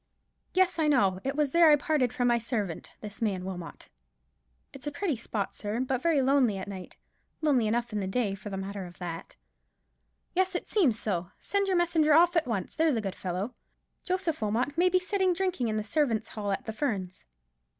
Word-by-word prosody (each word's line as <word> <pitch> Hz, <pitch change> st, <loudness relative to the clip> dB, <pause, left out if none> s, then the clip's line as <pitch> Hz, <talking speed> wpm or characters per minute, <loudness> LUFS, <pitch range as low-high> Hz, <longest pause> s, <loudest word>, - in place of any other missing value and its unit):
"Yes, 370 Hz, -2 st, +3 dB
I 310 Hz, -, +3 dB
know; 200 Hz, -10 st, +3 dB
it 270 Hz, +1 st, -2 dB
was 295 Hz, -2 st, +1 dB
there 335 Hz, 0 st, +6 dB
I 300 Hz, -, +8 dB
parted 290 Hz, -4 st, +1 dB
from 245 Hz, 0 st, 0 dB
my 240 Hz, -1 st, +3 dB
servant—from 215 Hz, -7 st, -4 dB
this 210 Hz, +1 st, -9 dB
man 195 Hz, -5 st, -1 dB
Wilmot." 180 Hz, -3 st, -7 dB, 0.9 s
"It's 275 Hz, +1 st, -9 dB
a -, -, -1 dB
pretty 315 Hz, +1 st, -1 dB
spot, 220 Hz, -3 st, -3 dB
sir, 210 Hz, +2 st, -3 dB
but 260 Hz, 0 st, -1 dB
very 310 Hz, -4 st, +3 dB
lonely 260 Hz, -6 st, +3 dB
at 190 Hz, -, -5 dB
night; 190 Hz, -2 st, -8 dB, 0.4 s
lonely 270 Hz, -8 st, +3 dB
enough 235 Hz, +1 st, -1 dB
in 210 Hz, -, 0 dB
the 190 Hz, -, -2 dB
day, 205 Hz, 0 st, 0 dB
for 205 Hz, +1 st, -7 dB
the 195 Hz, -, -4 dB
matter 195 Hz, -1 st, -5 dB
of 175 Hz, -, -14 dB
that." 170 Hz, -2 st, -6 dB, 1.0 s
"Yes, 375 Hz, +1 st, +1 dB
it -, -, -3 dB
seems 300 Hz, -, +3 dB
so. 180 Hz, -5 st, -2 dB
Send 400 Hz, 0 st, 0 dB
your 380 Hz, -, +2 dB
messenger 320 Hz, -3 st, +3 dB
off 345 Hz, +2 st, +5 dB
at 330 Hz, -6 st, +2 dB
once, 205 Hz, -6 st, -3 dB
there's 315 Hz, -4 st, +3 dB
a 225 Hz, -, 0 dB
good 195 Hz, -3 st, -3 dB
fellow. 190 Hz, +6 st, -4 dB, 0.5 s
Joseph 365 Hz, -5 st, -1 dB
Wilmot 230 Hz, +7 st, 0 dB
may 355 Hz, +2 st, +4 dB
be 370 Hz, -, +3 dB
sitting 370 Hz, 0 st, +1 dB
drinking 365 Hz, -8 st, -1 dB
in 215 Hz, -1 st, -1 dB
the 215 Hz, -, -1 dB
servants' 225 Hz, -3 st, 0 dB
hall 205 Hz, -2 st, -3 dB
at 195 Hz, -, -2 dB
the 220 Hz, -, -4 dB
Ferns." 200 Hz, -, -3 dB
245 Hz, 205 wpm, -29 LUFS, 205-315 Hz, 1.0 s, I